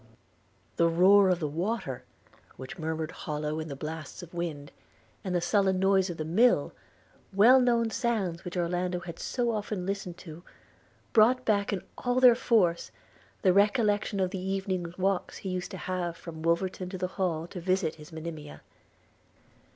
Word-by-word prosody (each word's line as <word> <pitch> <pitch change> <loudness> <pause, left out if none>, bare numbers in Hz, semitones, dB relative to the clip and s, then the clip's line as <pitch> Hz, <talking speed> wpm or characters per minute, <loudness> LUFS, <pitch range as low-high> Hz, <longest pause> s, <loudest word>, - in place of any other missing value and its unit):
The 170 - +4
roar 190 +4 +5
of 180 -2 +2
the 155 - -1
water, 165 - -3 0.5
which 130 +9 -9
murmured 160 0 -3
hollow 150 0 -4
in 160 - -5
the 140 - -6
blasts 155 +4 -7
of 170 - -12
wind, 160 -5 -4 0.5
and 185 -2 -2
the 175 - +1
sullen 190 +1 +2
noise 190 0 +3
of 170 - -5
the 155 - -3
mill, 220 +10 +3 0.6
well 225 +7 +6
known 235 -2 +2
sounds 205 -10 -1
which 180 +1 -6
Orlando 180 +1 -1
had 170 -1 -8
so 240 -2 -1
often 210 -4 -3
listened 195 -3 -4
to, 165 -1 -10 0.7
brought 245 +3 +4
back, 205 -2 +1
in 195 -3 -3 0.2
all 245 0 +1
their 250 -2 +8
force, 205 -8 +1 0.5
the 185 -3 +5
recollection 205 0 +2
of 185 -1 0
the 190 - -4
evening 190 -2 -2
walks 190 0 -1
he 195 - -6
used 185 -1 -3
to - - -7
have 175 -2 -3
from 160 -2 -9
Wolverton 180 +2 -1
to 185 - -5
the 185 0 -2
Hall 165 -4 0
to 180 - -7
visit 185 -2 0
his 150 - -12
Monimia. 160 -2 -8
185 Hz, 165 wpm, -28 LUFS, 165-200 Hz, 0.7 s, their